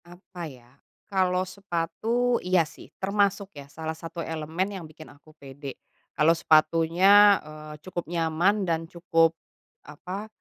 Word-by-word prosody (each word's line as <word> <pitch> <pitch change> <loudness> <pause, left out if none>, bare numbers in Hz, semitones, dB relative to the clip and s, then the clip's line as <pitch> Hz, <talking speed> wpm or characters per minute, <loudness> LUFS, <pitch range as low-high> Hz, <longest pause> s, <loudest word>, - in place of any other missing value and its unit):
Apa, 175 -1 -9
ya? 125 -3 -16 0.4
Kalau 185 -1 +2
sepatu? 200 +6 -1
Iya, 180 -2 +3
sih, - - -14
termasuk, 200 0 0
ya, 140 -1 -10
salah 160 +2 -5
satu 165 +1 -7
elemen 160 +3 -3
yang 185 -4 -7
bikin 155 0 -13
aku 150 +2 -21
pede. 140 0 -9 0.4
Kalau 155 +2 +5
sepatunya, 170 +6 +5
eee, 155 0 -10
cukup 180 -2 -5
nyaman, 175 +4 +1
dan 165 -1 -1
cukup, 165 -2 +2 0.5
apa, 195 +4 -7
170 Hz, 135 wpm, -26 LUFS, 155-190 Hz, 0.5 s, Kalau